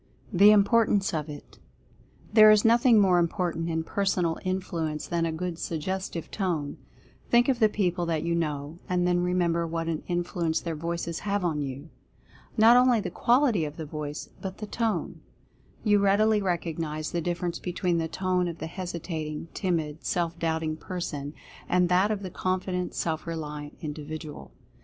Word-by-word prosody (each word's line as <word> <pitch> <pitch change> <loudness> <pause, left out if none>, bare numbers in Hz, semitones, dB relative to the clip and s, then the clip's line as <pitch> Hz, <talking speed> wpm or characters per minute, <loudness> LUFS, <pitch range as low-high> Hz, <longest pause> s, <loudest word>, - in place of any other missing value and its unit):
THE 200 +3 +7
IMPORTANCE 205 -1 +4
OF 155 -1 -2
IT. 145 -1 -11 0.7
There 215 -1 +9
is 215 0 +5
nothing 235 0 +6
more 185 -3 +4
important 170 -1 -1
in 160 0 -1
Personal 180 -3 0
Influ 180 -4 -2
ence 150 - -5
than 170 -1 0
a - - -2
good 170 +1 -4
Suggestive 170 +1 -4
Tone. 170 -8 -2 0.5
Think 240 0 +5
of 260 -3 +1
the 220 -2 +5
people 180 -4 0
that 160 -2 -1
you 170 0 0
know, 155 -1 -2
and 180 -1 +1
then 180 0 +2
remember 175 -2 +1
what 165 0 -3
an 160 -2 -2
influence 175 -2 -1
their 165 - -4
voices 170 +1 -3
have 200 -2 -1
on 155 -4 0
you. 140 +3 -6 0.7
Not 225 +3 +7
only 250 -2 +5
the - - -4
qual 250 +4 +3
ity 215 - +1
of 150 0 -5
the 160 - -5
voice, 150 0 -6
but 190 -1 -5
the 215 - -5
Tone. 225 +1 -2 0.6
You 205 -2 +4
readily 210 +2 +3
recognize 165 -4 -2
the 170 - -1
difference 175 0 -2
between 180 -1 -1
the 165 - -1
tone 180 +1 0
of 170 -1 -5
the - - -5
hesitating, 165 -3 -5
timid, 160 -5 -2
self 170 -1 -1
doubting 160 -1 -1
person, 155 -5 -5 0.3
and 180 -1 +3
that 185 +3 +3
of 210 -2 -2
the 185 - -5
confident, 185 0 -2
self 160 0 -2
reliant 150 -3 -6
individual. 150 0 -7
175 Hz, 170 wpm, -27 LUFS, 160-190 Hz, 0.7 s, There